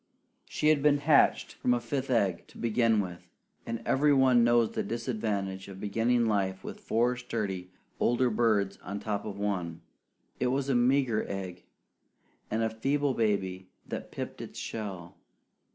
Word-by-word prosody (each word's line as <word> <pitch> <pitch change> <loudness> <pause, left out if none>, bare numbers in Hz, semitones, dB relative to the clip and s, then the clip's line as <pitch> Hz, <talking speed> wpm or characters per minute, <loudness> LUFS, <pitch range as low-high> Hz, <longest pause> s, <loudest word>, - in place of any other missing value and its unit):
She 150 - +1
had 155 -2 +4
been 145 0 +4
hatched 145 +1 +3
from 125 - +1
a - - 0
fifth 135 +2 -3
egg 100 -8 +1
to - - -16
begin 115 -2 +2
with; 90 -2 -7 0.4
and 115 0 -4
every 145 +2 +3
one 130 -3 +5
knows 120 -1 +4
the - - -2
disadvantage 105 -5 -3
of 95 -1 -9
beginning 115 +4 +1
life 95 -3 0
with - - -7
four 120 +3 +1
sturdy 105 -7 -4 0.3
older 120 +1 +2
birds 105 -3 +1
on 100 +2 -6
top 105 -1 -3
of 100 -2 -5
one. 90 -5 -2 0.6
It 125 - +1
was 135 +2 0
a - - +3
meager 125 -2 +3
egg, 95 -2 -6 0.8
and 110 +1 0
a 110 - +1
feeble 140 +5 0
baby 95 -5 -1 0.2
that - - -5
pipped - - -6
its - - -9
shell. 95 -6 -6
115 Hz, 160 wpm, -29 LUFS, 100-125 Hz, 0.8 s, one